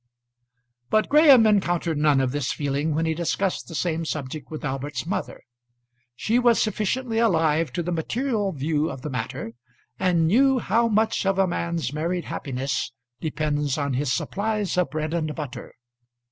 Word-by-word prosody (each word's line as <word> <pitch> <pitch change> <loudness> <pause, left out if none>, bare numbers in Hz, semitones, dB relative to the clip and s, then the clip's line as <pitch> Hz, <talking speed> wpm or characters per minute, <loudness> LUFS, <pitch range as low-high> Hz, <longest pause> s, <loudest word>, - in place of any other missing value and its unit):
But 215 0 +2
Graham 285 -6 +7
encountered 175 -6 +1
none 150 -3 +4
of 130 -1 0
this 145 -2 -1
feeling 145 +1 -1
when 165 +1 +1
he 160 - +1
discussed 175 +3 -1
the 165 - -8
same 165 +1 -1
subject 155 -2 -5
with 155 -1 -6
Albert's 135 0 -3
mother. 190 +4 -4 0.7
She 225 - +1
was 240 -2 +4
sufficiently 225 +3 0
alive 165 -7 +2
to 175 - -2
the 175 - -3
material 210 - -1
view 150 0 -1
of 130 - -8
the 150 - -4
matter, 115 -1 -4 0.5
and 175 -3 +2
knew 265 +9 +4
how 230 +1 +2
much 220 0 +1
of 195 -1 +2
a 195 - +4
man's 170 -6 -2
married 170 +3 -2
happiness 135 -2 -3 0.3
depends 150 -2 -1
on 140 -2 -1
his 130 +1 0
supplies 200 +6 -1
of 180 -4 +1
bread 155 +2 -3
and 155 -3 -2
butter. 145 -5 -7
165 Hz, 160 wpm, -24 LUFS, 145-200 Hz, 0.7 s, Graham